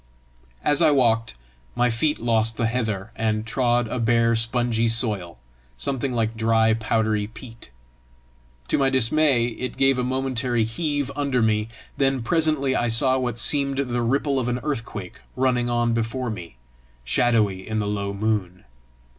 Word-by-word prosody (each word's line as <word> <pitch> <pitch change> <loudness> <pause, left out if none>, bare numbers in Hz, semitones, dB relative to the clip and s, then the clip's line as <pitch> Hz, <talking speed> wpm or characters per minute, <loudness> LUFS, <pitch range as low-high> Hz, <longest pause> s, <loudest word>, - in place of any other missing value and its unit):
As 145 - +3
I - - +6
walked, 115 -5 +2 0.4
my 120 0 +2
feet 150 +7 0
lost 115 -1 +1
the 115 - 0
heather, 110 -3 -2
and 110 -1 -1
trod 120 0 +1
a 125 - -3
bare 115 0 +2
spongy 115 0 +1
soil, 105 - -1 0.4
something 135 - -2
like 115 -2 -1
dry, 110 0 +3
powdery 110 -1 0
peat. 115 - -13 1.0
To - - +1
my 135 -1 +3
dismay 130 0 +3
it 125 +2 -5
gave 135 -1 +3
a - - 0
momentary 130 -2 0
heave 145 +4 -2
under 140 -5 0
me; 110 0 +1 0.3
then 135 -3 +1
presently 155 -2 +1
I 120 - +1
saw 130 +3 +2
what 120 -3 -2
seemed 140 +2 +1
the 125 -3 -1
ripple 135 +3 0
of 125 - -2
an 125 +1 -1
earthquake 115 -7 -5
running 125 -2 +1
on 120 -1 +1
before 115 +2 -2
me, 85 - -8 0.5
shadowy 105 - +1
in 110 0 -2
the 105 - 0
low 100 -1 -2
moon. 100 -3 -2
120 Hz, 155 wpm, -23 LUFS, 110-130 Hz, 1.0 s, I